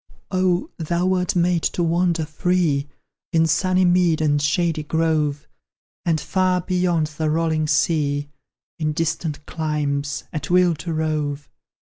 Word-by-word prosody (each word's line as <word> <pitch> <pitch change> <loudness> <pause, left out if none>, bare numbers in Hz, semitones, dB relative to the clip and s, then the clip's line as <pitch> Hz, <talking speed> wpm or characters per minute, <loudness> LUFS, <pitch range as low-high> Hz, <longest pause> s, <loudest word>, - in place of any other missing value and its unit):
Oh, 185 -1 +1
thou 170 +2 -1
wert 185 -1 +1
made 175 -1 +2
to 175 - 0
wander 170 -1 +1
free 155 -2 0 0.4
In 165 -1 +3
sunny 185 +3 +2
mead 175 -2 +3
and 145 -2 +2
shady 160 +2 +1
grove, 150 -2 0 0.6
And 165 -2 +2
far 185 0 +1
beyond 180 -3 +1
the 155 -1 +1
rolling 160 -1 0
sea, 150 -2 +1 0.5
In 155 -1 0
distant 160 -2 -2
climes, 145 -3 -2
at 155 - -4
will 180 -1 +4
to 160 +2 -6
rove! 150 -3 -2
160 Hz, 130 wpm, -22 LUFS, 150-175 Hz, 0.6 s, will